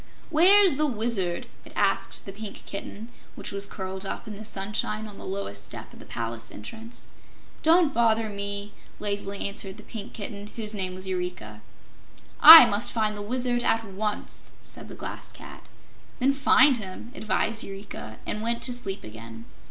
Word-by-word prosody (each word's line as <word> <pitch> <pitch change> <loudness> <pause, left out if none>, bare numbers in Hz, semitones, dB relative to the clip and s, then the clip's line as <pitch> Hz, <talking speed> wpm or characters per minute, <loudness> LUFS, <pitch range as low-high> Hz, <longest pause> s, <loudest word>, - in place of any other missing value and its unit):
"Where's 365 0 +7
the 305 0 +2
Wizard?" 215 -8 -2 0.2
it - - -14
asked - - 0
the 195 - -6
Pink 205 +1 -8
Kitten, 205 +3 -6 0.3
which - - -6
was 200 0 -1
curled 190 0 -6
up 195 - -6
in 210 - -7
the 210 - -9
sunshine 210 +1 -3
on 210 -2 -11
the - - -9
lowest 190 - -5
step - - -9
of - - -14
the - - -12
palace 115 0 -5
entrance. 225 - -10 0.5
"Don't 325 -2 +4
bother 225 -1 +2
me," 200 0 -4 0.3
lazily 200 -1 0
answered 195 -1 -4
the - - -12
Pink 215 -3 -8
Kitten, 205 -1 -6
whose 215 -2 +1
name 185 -3 -3
was 185 +1 -3
Eureka. 180 - -5 0.8
"I 320 -2 +13
must 215 0 +2
find 215 -2 0
the 205 - -6
Wizard 245 +2 -1
at 225 -1 +1
once!" 210 +1 -4
said - - -9
the - - -10
Glass - - -7
Cat. - - -12 0.5
"Then 270 +2 +2
find 275 -1 +5
him," 205 +2 -8
advised 220 -2 -1
Eureka, 195 - -8
and 210 - -3
went 235 +1 -1
to 250 - -1
sleep 200 -5 -2
again. 115 +1 -10
210 Hz, 170 wpm, -26 LUFS, 195-235 Hz, 0.8 s, I